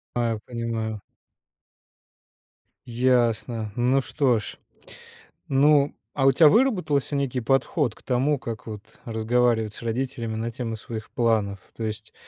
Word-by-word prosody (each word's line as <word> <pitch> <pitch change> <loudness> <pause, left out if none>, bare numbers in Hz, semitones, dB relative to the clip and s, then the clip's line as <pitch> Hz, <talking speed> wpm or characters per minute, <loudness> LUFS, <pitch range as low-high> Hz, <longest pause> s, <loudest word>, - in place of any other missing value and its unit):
Аю 115 -2 0
понимаю. 115 -3 -3 1.9
Ясно. 120 -2 +1
Ну, 125 +3 +2
что 130 -4 +1
ж. 105 - -8 0.9
Ну, 140 +1 +4 0.2
а 135 - 0
у 135 - +7
тя 160 +2 +6
выработался 180 - +2
некий 135 -2 -1
подход 135 +1 +1
к - - -20
тому, 135 +3 +1
как 115 -2 -6
вот 105 -2 -6 0.2
разговаривать 115 -1 +1
с - - -10
родителями 115 -1 -3
на 115 +1 -3
тему 115 -1 -4
своих 110 0 -8
планов? 110 -5 +1 0.2
То 115 - -5
есть, 105 -1 -5
120 Hz, 125 wpm, -25 LUFS, 110-135 Hz, 1.9 s, у